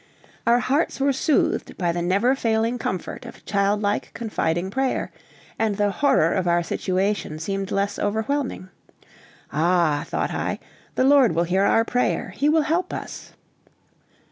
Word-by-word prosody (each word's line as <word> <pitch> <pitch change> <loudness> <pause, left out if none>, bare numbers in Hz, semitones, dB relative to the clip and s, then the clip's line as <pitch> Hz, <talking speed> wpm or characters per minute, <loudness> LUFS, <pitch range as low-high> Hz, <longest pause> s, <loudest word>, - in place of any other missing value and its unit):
Our 235 +1 +6
hearts 275 +6 0
were 275 0 +2
soothed 280 +2 0
by 175 -2 +1
the 170 +1 -2
never 200 +9 +2
failing 230 -1 0
comfort 185 -5 -4
of - - -12
child 200 +1 +1
like, 205 0 -1
confiding 190 -5 -1
prayer, 265 +3 -1 0.5
and 215 -2 0
the 205 -1 +2
horror 230 - +3
of 185 -2 0
our 175 0 +2
situation 185 -2 -1
seemed 195 +4 -3
less 200 +1 -1
overwhelming. 220 0 -2 0.8
"Ah," 160 -1 +2
thought - - -2
I, - - -2 0.4
"the - - +2
Lord 270 -6 +5
will 170 - +2
hear 190 +3 +1
our 225 +2 +3
prayer! 245 +2 0
He 290 +2 0
will 315 0 +3
help 330 +4 0
us." - - -8
205 Hz, 150 wpm, -23 LUFS, 185-255 Hz, 0.8 s, Our